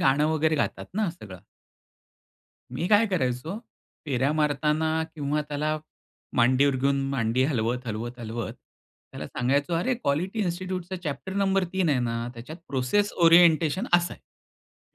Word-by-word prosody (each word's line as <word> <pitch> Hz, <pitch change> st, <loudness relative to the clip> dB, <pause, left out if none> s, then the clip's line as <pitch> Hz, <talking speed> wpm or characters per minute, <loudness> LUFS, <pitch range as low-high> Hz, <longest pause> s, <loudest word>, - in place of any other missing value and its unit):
गाणं 140 Hz, +3 st, +3 dB
वगैरे 160 Hz, 0 st, +2 dB
गातात -, -, -2 dB
ना 210 Hz, -3 st, 0 dB
सगळं. 100 Hz, -, -12 dB, 1.3 s
मी 130 Hz, +8 st, -2 dB
काय 215 Hz, +2 st, +5 dB
करायचो 160 Hz, -, -2 dB, 0.5 s
फेऱ्या 135 Hz, +1 st, +1 dB
मारताना 150 Hz, +1 st, +1 dB, 0.3 s
किंवा 150 Hz, 0 st, -1 dB
त्याला 155 Hz, +1 st, -1 dB, 0.6 s
मांडीवर 130 Hz, +3 st, +4 dB
घेऊन 140 Hz, +1 st, +1 dB
मांडी 125 Hz, -1 st, +1 dB
हलवत, 125 Hz, -2 st, -1 dB
हलवत, 120 Hz, +3 st, -5 dB
हलवत 115 Hz, -2 st, -5 dB
त्याला -, -, -13 dB
सांगायचो, 140 Hz, +6 st, 0 dB
"अरे 215 Hz, +10 st, +1 dB
क्वालिटी 190 Hz, -, -1 dB
इन्स्टिट्यूटचा 185 Hz, 0 st, -3 dB
चॅप्टर 150 Hz, +5 st, -4 dB
नंबर 195 Hz, -1 st, +2 dB
3 190 Hz, -3 st, +1 dB
आहे 140 Hz, -4 st, +2 dB
ना, 115 Hz, 0 st, -2 dB
त्याच्यात 125 Hz, +8 st, -9 dB
प्रोसेस 140 Hz, +11 st, +1 dB
ओरिएंटेशन 170 Hz, -, +5 dB
असं 175 Hz, 0 st, +2 dB
आहे. -, -, -32 dB
150 Hz, 135 wpm, -26 LUFS, 125-175 Hz, 1.3 s, काय